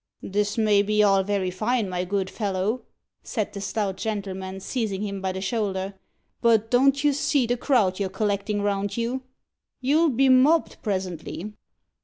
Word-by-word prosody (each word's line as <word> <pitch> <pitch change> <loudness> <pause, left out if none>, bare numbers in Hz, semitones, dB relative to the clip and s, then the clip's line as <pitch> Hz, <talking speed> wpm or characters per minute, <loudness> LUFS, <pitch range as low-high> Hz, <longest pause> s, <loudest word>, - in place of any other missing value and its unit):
"This 205 +2 -1
may 210 -2 +4
be 210 +1 +2
all 195 -1 +4
very 190 -2 -1
fine, 215 +4 0
my 180 0 -2
good 190 0 -1
fellow," 200 +3 -2 0.4
said 215 -5 -3
the 200 - -6
stout 195 -1 -2
gentleman, 190 -3 -4
seizing 210 -2 -2
him 200 -2 -4
by 190 0 -1
the 190 0 -5
shoulder; 195 -3 -2 0.5
"but 225 -1 +3
don't 275 +3 +4
you 295 -1 +4
see 280 -1 +1
the 240 +1 +1
crowd 225 -8 +2
you're 195 -2 -1
collecting 205 +1 -1
round 200 0 -1
you? 240 +3 -1 0.6
You'll 305 +6 +3
be 270 +1 +3
mobbed 270 +6 +4
presently." 190 -1 -4
205 Hz, 160 wpm, -25 LUFS, 190-235 Hz, 0.6 s, may